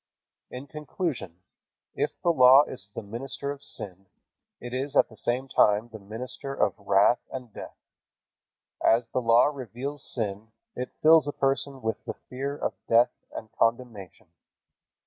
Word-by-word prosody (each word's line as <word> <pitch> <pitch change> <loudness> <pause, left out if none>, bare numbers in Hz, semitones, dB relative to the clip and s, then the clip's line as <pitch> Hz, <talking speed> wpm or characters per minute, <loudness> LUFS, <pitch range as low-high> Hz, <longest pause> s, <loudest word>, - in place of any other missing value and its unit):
In 125 +2 -8
conclusion, 145 - -5 0.5
if - - -2
the 175 - +4
Law 130 -1 +8
is 95 -9 -7
the - - -5
minister 135 +6 -5
of 145 -1 -9
sin, 95 0 -6 0.5
it 120 0 -8
is 135 +2 -3
at - - +5
the 110 - -15
same 125 +4 -2
time 105 -2 +3
the 110 -1 -10
minister 125 +7 -7
of - - +2
wrath 100 +4 +4
and 125 -5 -7
death. - - -9 1.1
As 115 +2 +4
the 130 - -1
Law 115 +1 +5
reveals 135 +3 -6
sin 110 -1 -4 0.2
it 125 0 -4
fills 155 -1 +7
a - - 0
person 135 -1 -1
with 110 0 -2
the - - -5
fear 140 +3 -5
of - - -2 0.2
death 120 +1 +5 0.2
and 110 - -8
condemnation. 115 -5 -2
125 Hz, 150 wpm, -27 LUFS, 110-135 Hz, 1.1 s, Law